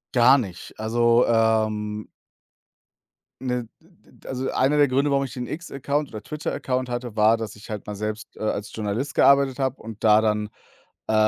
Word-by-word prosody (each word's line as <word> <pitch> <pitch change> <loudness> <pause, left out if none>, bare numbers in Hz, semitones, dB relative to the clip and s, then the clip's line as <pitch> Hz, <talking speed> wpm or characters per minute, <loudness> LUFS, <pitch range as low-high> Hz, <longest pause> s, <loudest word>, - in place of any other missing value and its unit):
Gar 125 +3 +7
nicht. 95 -9 -6
Also, 120 +2 +3
ähm 110 -2 +1 1.3
ne, 125 -2 -1 0.2
d 170 +2 -25
d - - -24
also, 130 0 -3
einer 140 +3 +2
der 145 -1 +5
Gründe, 140 +3 +1
warum 140 0 +2
ich 130 - -8
den 125 -2 -5
X-Account 145 -2 -3
oder 110 -1 -7
Twitter-Account 130 -3 -3
hatte, 120 -2 -4
war, 110 +1 +5
dass 110 -2 -6
ich 105 - -14
halt 105 -2 -5
mal 105 - -5
selbst, 105 +2 -5
äh, - - -13
als 105 -1 -3
Journalist 110 +6 -3
gearbeitet 140 -1 +4
habe 130 0 -1
und 110 0 -9
da 105 0 +6
dann, 105 -1 0 0.6
äh, - - 0
120 Hz, 175 wpm, -24 LUFS, 110-135 Hz, 1.3 s, Gar